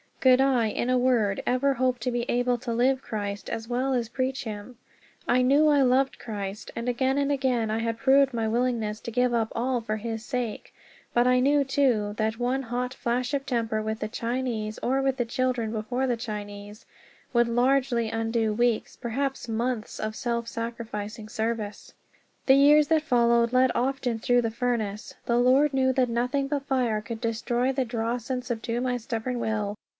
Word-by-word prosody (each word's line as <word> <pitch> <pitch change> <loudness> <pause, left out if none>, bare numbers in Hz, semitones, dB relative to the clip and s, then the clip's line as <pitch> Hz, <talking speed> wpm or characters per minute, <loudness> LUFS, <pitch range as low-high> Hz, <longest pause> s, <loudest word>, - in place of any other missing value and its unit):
Could 260 0 +5
I, 260 -4 +3
in 235 +3 -2
a 255 - +3
word, 235 -6 +2
ever 265 +3 +2
hope 255 0 +1
to 250 +3 -2
be 240 0 -2
able 245 0 +1
to 235 -1 -3
live 255 +3 +2
Christ 205 -3 -5
as 225 -1 -4
well 255 +3 0
as 235 -3 -1
preach 260 +1 -2
him? 220 +2 -7 0.5
I 250 +1 +3
knew 280 +4 +4
I 290 -2 +4
loved 265 +1 +2
Christ; 205 -3 -6
and 230 +1 -4
again 260 +2 +1
and 285 0 +1
again 255 -5 0
I 220 - 0
had 230 0 -2
proved 270 +2 +4
my 225 -1 -1
willingness 225 -2 0
to 235 - -6
give 250 +1 +1
up 225 -2 0
all 245 +1 0
for 220 -1 -3
his 225 0 -5
sake. 245 -3 -4 0.4
But 240 0 +3
I 250 0 +4
knew, 285 +2 +3
too, 255 -7 +1
that 220 0 0
one 255 +2 0
hot 250 +1 -3
flash 245 +2 -1
of 275 -1 -2
temper 225 -3 -1
with 220 0 -3
the 215 - -2
Chinese, 230 -2 -3
or 265 +2 +1
with 270 -1 0
the 245 - 0
children 245 -2 -1
before 235 +4 -2
the 245 -2 0
Chinese, 205 -2 -7 0.5
would 235 -1 +4
largely 245 -1 +2
undo 225 -1 0
weeks, 235 0 0
perhaps 265 +2 -3
months, 230 0 -2
of 215 0 -3
self 235 -1 -2
sacrificing 225 -2 -5
service. 220 -2 -4 0.5
The 265 - +6
years 290 +2 +6
that 320 0 +3
followed 235 -3 +3
led 255 0 +4
often 250 -2 -1
through 245 +2 +2
the 225 - -1
furnace. 235 -1 -2
The 235 - +1
Lord 265 +4 +4
knew 260 -1 +3
that 255 -2 +2
nothing 250 +4 0
but 285 -1 -2
fire 245 -6 0
could 230 +1 -7
destroy 240 +2 0
the 265 -1 -1
dross 235 0 -3
and 255 -1 -2
subdue 240 0 -3
my 250 -1 0
stubborn 240 +1 -3
will. 215 -2 -2
240 Hz, 190 wpm, -26 LUFS, 225-260 Hz, 0.5 s, The